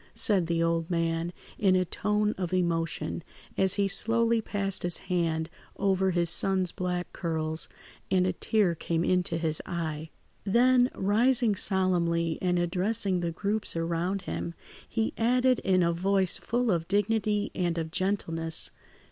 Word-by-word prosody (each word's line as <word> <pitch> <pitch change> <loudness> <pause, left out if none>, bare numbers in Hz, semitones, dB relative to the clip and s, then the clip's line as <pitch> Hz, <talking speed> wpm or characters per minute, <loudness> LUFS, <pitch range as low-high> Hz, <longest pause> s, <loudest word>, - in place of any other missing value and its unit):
said 190 -6 +2
the 165 0 0
old 165 0 0
man 165 0 -1 0.3
in 190 -2 +3
a 185 0 +2
tone 210 +4 0
of 180 -2 -4
emotion, 170 -1 -1 0.3
as 190 0 +3
he 200 -1 +1
slowly 230 +3 +3
passed 200 -3 -1
his 175 -1 +2 0.2
hand 160 -2 0 0.3
over 190 -1 +1
his 175 -1 +1
son's 185 +1 +2
black 180 -1 -4
curls, 160 -2 -2 0.4
and 185 -1 +2
a 185 - 0
tear 200 0 +1
came 165 0 -2
into 180 -2 +1
his 160 -2 +1
eye. 160 -2 -4 0.3
Then, 245 +4 +4
rising 230 +3 +2
solemnly 175 -4 0
and 180 -1 +1
addressing 185 +2 0
the 170 -1 -2
groups 205 +4 -2
around 170 +3 -2
him, 170 - -5 0.3
he 225 -1 -1
added 250 +2 +3
in 185 -2 +2
a 170 0 +1
voice 190 +1 +2
full 240 0 0
of 165 -2 -1
dignity 205 +1 0
and 175 -2 -1
of 160 -1 -3
gentleness. 165 -4 0
185 Hz, 150 wpm, -28 LUFS, 170-205 Hz, 0.4 s, Then